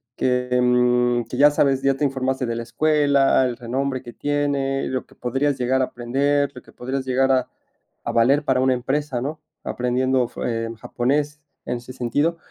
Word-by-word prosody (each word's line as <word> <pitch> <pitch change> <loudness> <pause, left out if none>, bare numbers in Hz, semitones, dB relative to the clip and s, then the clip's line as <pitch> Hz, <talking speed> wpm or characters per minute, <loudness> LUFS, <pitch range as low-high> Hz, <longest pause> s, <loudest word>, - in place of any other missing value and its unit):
que, 125 0 0
em, 125 -1 +2
que 115 - -7
ya 145 +1 +7
sabes, 135 -2 +2
ya 135 0 +2
te 145 - 0
informaste 130 -1 -1
de 115 - -2
la 115 - -3
escuela, 140 +2 +3
el 120 -2 -3
renombre 130 +2 -2
que 120 - -10
tiene, 140 -2 -1
lo 130 -1 -3
que - - -21
podrías 135 +3 -1
llegar 130 +1 +1
a 130 - +3
aprender, 140 +4 0
lo 125 - -9
que - - -19
podrías 130 +2 -4
llegar 135 +1 +2
a 130 - 0 0.6
a - - -1
valer 135 +6 +3
para 130 -2 +2
una 130 0 +3
empresa, 135 +1 -2
¿no? 150 +3 -5 0.2
Aprendiendo 125 0 0
fu - - -7
eh, 115 -1 -2
japonés 145 +5 -1 0.2
en 125 - -2
ese 120 +1 -10
sentido. 145 +7 0
130 Hz, 185 wpm, -22 LUFS, 125-140 Hz, 0.6 s, ya